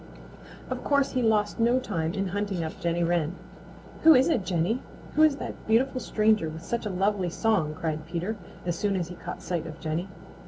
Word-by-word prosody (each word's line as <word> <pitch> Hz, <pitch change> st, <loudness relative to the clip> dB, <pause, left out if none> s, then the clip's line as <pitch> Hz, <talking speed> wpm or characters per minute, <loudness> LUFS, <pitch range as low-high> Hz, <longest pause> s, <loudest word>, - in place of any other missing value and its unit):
Of -, -, -3 dB
course 280 Hz, -1 st, +2 dB
he 255 Hz, -, 0 dB
lost 215 Hz, -1 st, +2 dB
no 235 Hz, +2 st, +4 dB
time 170 Hz, -9 st, -2 dB
in 195 Hz, -1 st, -1 dB
hunting 200 Hz, -2 st, -2 dB
up 160 Hz, -, -6 dB
Jenny 170 Hz, 0 st, 0 dB
Wren. 170 Hz, 0 st, +1 dB, 0.7 s
"Who 320 Hz, -1 st, +8 dB
is 260 Hz, +4 st, +5 dB
it, 240 Hz, -, +2 dB
Jenny? 185 Hz, +7 st, 0 dB, 0.3 s
Who 305 Hz, -, +2 dB
is 310 Hz, -2 st, +6 dB
that -, -, -7 dB
beautiful 255 Hz, +4 st, +2 dB
stranger 215 Hz, -7 st, +2 dB
with 160 Hz, +1 st, -8 dB
such 235 Hz, -2 st, -2 dB
a -, -, -2 dB
lovely 190 Hz, 0 st, +1 dB
song?" 175 Hz, -6 st, +1 dB
cried 155 Hz, -1 st, -3 dB
Peter, 175 Hz, +6 st, -2 dB, 0.3 s
as 175 Hz, -1 st, 0 dB
soon 200 Hz, +3 st, 0 dB
as 175 Hz, -3 st, -2 dB
he -, -, -6 dB
caught -, -, -7 dB
sight 170 Hz, -3 st, -2 dB
of 155 Hz, -, -9 dB
Jenny. 165 Hz, +4 st, -3 dB
195 Hz, 200 wpm, -27 LUFS, 170-225 Hz, 0.7 s, Who